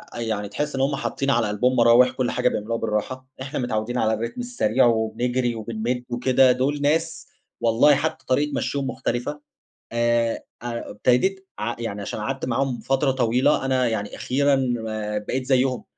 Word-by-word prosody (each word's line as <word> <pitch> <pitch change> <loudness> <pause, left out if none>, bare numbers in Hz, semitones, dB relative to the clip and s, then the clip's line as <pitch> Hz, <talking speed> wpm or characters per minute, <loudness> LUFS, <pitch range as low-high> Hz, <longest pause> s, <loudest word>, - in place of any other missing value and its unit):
يعني 110 -3 -3
تحس 150 +6 -3
إن 135 - -1
همّ 140 +1 +1
حاطين 135 0 -2
على 115 -3 +2
قلبهم 125 +5 +1
مراوح، 120 +1 +6
كل 130 -1 -1
حاجة 125 0 +2
بيعملوها 115 +1 -2
بالراحه، 115 +4 -3
إحنا 135 +3 -4
متعودين 120 0 -2
على 110 -2 +2
الرتم 115 - -3
السريع 135 - +1
وبنجري 120 +2 0
وبنمد 115 +3 -3
وكده، 125 +2 +4
دول 135 +4 0
ناس 160 +3 0 0.3
والله 120 +5 +5
حتّى 130 - -2
طريقة 145 +3 +1
مشيهم 140 -1 -2
مختلفة. 130 +4 -3 0.5
آآ، 120 0 +1 0.2
ابتديت 125 - 0
ع 115 +2 -2
يعني 105 -3 -4
عشان 100 - -5
قعدت 135 +5 -3
معاهم 130 0 -1
فترة 135 0 +1
طويلة 130 +3 +2
أنا 130 -2 +2
يعني 105 -3 -3
أخيرًا 140 +2 +1 0.6
بقيت 125 +5 -3
زيهم، 130 -1 +1
125 Hz, 155 wpm, -23 LUFS, 115-135 Hz, 0.6 s, مراوح